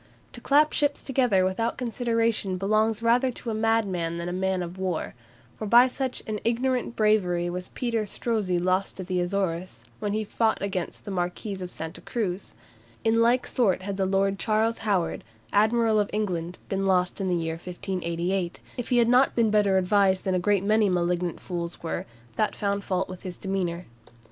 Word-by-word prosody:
To - - -9
clap 300 +2 +4
ships 290 -1 +1
together 245 -8 +2
without 205 +5 -1
consideration 230 -5 0
belongs 215 +3 +1
rather 245 +3 +3
to 235 - -5
a - - -2
madman 205 -7 0
than 170 - -4
to 175 - -3
a - - -4
man 190 0 0
of 175 +2 -8
war; 185 -4 -2 0.5
for 215 - -3
by 240 +4 +7
such 260 0 -3
an 215 -2 -3
ignorant 245 +1 0
bravery 180 -5 +2
was 180 +1 -5
Peter 235 -3 -1
Strozzi 205 -4 -1
lost 185 +3 0
at 185 - -4
the 180 0 -1
Azores, 180 -1 -2
when 205 -2 -2
he 215 +1 0
fought 220 +1 0
against 190 -3 -4
the 205 - -5
Marquis 185 +2 -3
of 180 - -5
Santa 160 0 -7
Cruz. 200 -5 -3 0.5
In 225 +1 +3
like 240 +2 +3
sort 195 -7 +1
had 200 0 -4
the 190 -1 +1
Lord 195 0 +1
Charles 225 +1 +1
Howard, 195 -6 0 0.3
Admiral 220 +1 +3
of 205 - 0
England, 180 -5 -2
been 195 0 -1
lost 185 +1 +1
in 190 - -1
the 180 - +1
year 165 -1 -1
1588, 175 +1 -3 0.2
if 245 - -4
he 245 - +3
had 235 -1 +5
not 250 +3 +4
been 230 -3 +3
better 205 -2 +3
advised 190 0 +3
than 190 - 0
a 185 - +2
great 200 +1 +2
many 210 0 +3
malignant 175 -1 0
fools 170 -2 -5
were, 165 - -3 0.3
that 215 - +1
found 200 -1 -1
fault 185 -1 -1
with 185 -1 -9
his 180 -2 -7
demeanour. 185 -3 -2
195 Hz, 190 wpm, -26 LUFS, 180-225 Hz, 0.5 s, by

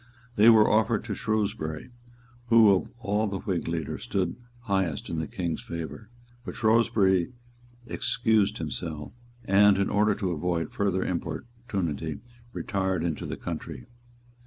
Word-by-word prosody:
They 110 +3 +7
were 110 -2 +7
offered 110 0 +2
to 110 -2 -4
Shrewsbury, 105 -6 -2 0.6
who 115 -3 +7
of 90 - -2
all 105 -2 0
the 100 -1 -3
Whig 95 -5 -3
leaders 80 -3 -3
stood 90 -3 -1 0.3
highest 95 -9 -1
in 80 - -2
the 80 - -3
King's 85 -4 -3
favour; 85 +6 -7 0.3
but - - -7
Shrewsbury 110 -4 +3 0.5
excused 110 -4 +1
himself, 80 -1 -5 0.3
and, 100 +1 +5
in 100 - 0
order 105 0 +3
to 95 -3 -2
avoid 85 -1 -1
further 95 -2 0
importunity, 85 - -4 0.3
retired 95 -6 -1
into 85 -3 -2
the - - -5
country. - - -6
95 Hz, 135 wpm, -27 LUFS, 85-110 Hz, 0.6 s, They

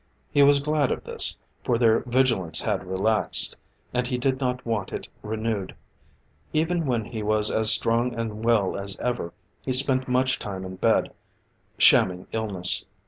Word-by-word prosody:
He 145 - +3
was 140 0 +6
glad 150 -3 +1
of - - -3
this, - - 0 0.3
for 120 - +1
their 115 -1 +4
vigilance 120 -10 +1
had 95 -4 -2
relaxed, 105 +3 +1 0.4
and 125 0 0
he 125 - -2
did 130 +1 0
not 125 -2 -2
want 110 -5 -2
it - - -6
renewed. 110 -2 -3 0.8
Even 165 0 0
when 120 -4 -1
he 110 0 -6
was 105 0 +1
as 110 0 +2
strong 115 +2 +2
and 110 -1 -5
well 115 -5 +2
as 100 -1 -4
ever, 120 -9 -3 0.3
he 130 - -3
spent 130 0 +2
much 130 +1 +1
time 95 -2 -6
in 95 0 -8
bed, - - +1 0.7
shamming 90 0 +4
illness. 100 -5 +1
115 Hz, 160 wpm, -25 LUFS, 105-130 Hz, 0.8 s, was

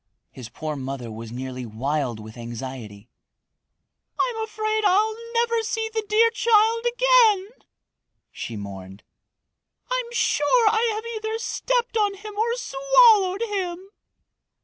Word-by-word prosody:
His 120 -3 -10
poor 155 +6 -5
mother 130 -3 -6
was 110 +1 -8
nearly 130 +1 -6
wild 125 +1 -2
with 110 +1 -11
anxiety. 120 -3 -8 1.1
"I'm 455 -3 0
afraid 435 0 -2
I'll 420 +3 +3 0.2
never 465 0 +2
see 445 0 -3
the 440 -1 -1
dear 455 +2 +4
child 460 +1 +3
again," 475 -5 +4 0.8
she 115 - -6
mourned. 95 -1 -9 0.9
"I'm - - -1
sure 460 0 +2
I 450 +1 +2
have 440 +1 -5
either 440 -1 -4
stepped 485 +1 -1
on 410 -2 +1
him 420 +2 -9
or 460 +3 0
swallowed 485 -6 +4
him!" 380 -3 -4
425 Hz, 125 wpm, -24 LUFS, -, 1.1 s, dear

